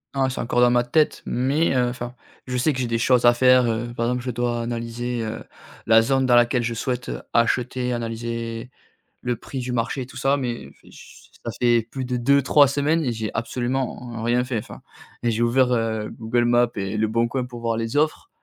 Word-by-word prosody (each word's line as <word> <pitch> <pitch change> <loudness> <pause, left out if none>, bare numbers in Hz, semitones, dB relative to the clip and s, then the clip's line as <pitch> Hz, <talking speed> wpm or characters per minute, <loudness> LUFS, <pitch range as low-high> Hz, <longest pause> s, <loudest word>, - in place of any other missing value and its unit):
Non, 135 -1 +2
c'est 130 - -5
encore 120 +1 +1
dans 120 0 +5
ma 120 0 +3
tête, 150 +5 +1
mais, 135 +5 +1
heu, 125 -1 +2
enfin, 120 0 -6 0.3
je 125 0 -2
sais 130 +5 +2
que 130 - -5
j'ai 125 - -1
des 115 - 0
choses 125 +1 +3
à 120 - +7
faire, 125 0 +5
heu, 120 +1 -2
par 115 - -1
exemple, 125 0 -1
je 125 - -2
dois 120 0 -1
analyser, 120 +1 -3
heu, 110 0 -5 0.4
la 115 0 +6
zone 135 +3 +1
dans 125 -1 +4
laquelle 120 0 +3
je 115 0 -1
souhaite, 125 +1 -3
heu, - - -5
acheter, 125 +1 +1
analyser 115 0 -4 0.5
le 125 -1 -1
prix 135 +4 -7
du 125 0 -4
marché 120 +3 -1
et 125 - -7
tout - - -15
ça, 135 +1 +2
mais 120 -4 -4
fé - - -19
ch - - -15 0.2
ça 115 - -3
fait 120 -1 +4
plus 135 -1 -3
de 125 0 -2
2-3 140 +3 +4
semaines 145 +4 +1
et 125 - 0
j'ai 110 -1 -3
absolument 120 0 -3
rien 120 +1 +2
fait 125 -2 -2
enfin - - -9 0.4
et 120 - +1
j'ai 115 +1 -1
ouvert, 125 +2 +3
heu, 110 -2 -1
Google 120 +2 -1
Maps 120 0 +3
et 100 +1 -3
Le 110 0 +2
Bon 115 +2 +1
Coin 130 +1 -2
pour 120 -1 -9
voir 115 -1 -1
les 115 +3 -3
offres, 155 - 0
120 Hz, 225 wpm, -23 LUFS, 115-130 Hz, 0.5 s, à